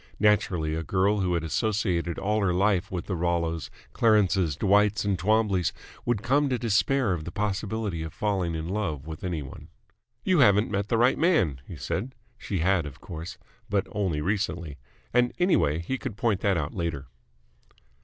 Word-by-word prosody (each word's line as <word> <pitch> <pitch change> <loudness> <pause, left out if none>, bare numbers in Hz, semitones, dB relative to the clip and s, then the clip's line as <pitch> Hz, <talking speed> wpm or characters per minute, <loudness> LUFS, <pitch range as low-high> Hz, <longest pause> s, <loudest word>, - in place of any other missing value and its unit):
Naturally 100 -7 +2
a 80 - -2
girl 95 +5 +1
who 90 -2 +1
had 85 - -1
associated 85 -1 0
all 105 +2 0
her 90 -3 +1
life 100 0 +2
with 90 -2 -4
the 95 - -2
Rollos, 85 -1 -1 0.2
Clarences, 95 - +3
Dwights, 105 +3 +3
and 100 -1 +1
Twombleys 100 -1 +1 0.3
would 120 -3 0
come 140 +3 +2
to 125 - +1
despair 120 0 +2
of 85 -3 -3
the 85 - -6
possibility 105 -2 -2
of 80 -1 -5
falling 95 -5 -1
in 80 0 -4
love 90 -8 -2
with 80 -1 -8
any 85 -5 -2
one. 65 - -11 0.6
"You 185 -3 +3
haven't 105 -3 +5
met 100 +1 -1
the 115 - +1
right 120 +3 +3
man," 105 - +2
he - - -8
said. 125 +6 -4 0.2
She 95 -5 -3
had, 90 -3 +2
of 70 - -10
course, 85 +1 -8 0.3
but 100 -1 +1
only 95 -8 -1
recently: 85 -5 -2 0.3
and, 125 0 +3
anyway, 175 - +2
he 105 +11 -3
could 105 - -6
point 115 -5 +1
that 100 -3 +1
out 75 -2 -3
later. 85 -6 -3
95 Hz, 175 wpm, -27 LUFS, 85-105 Hz, 0.6 s, haven't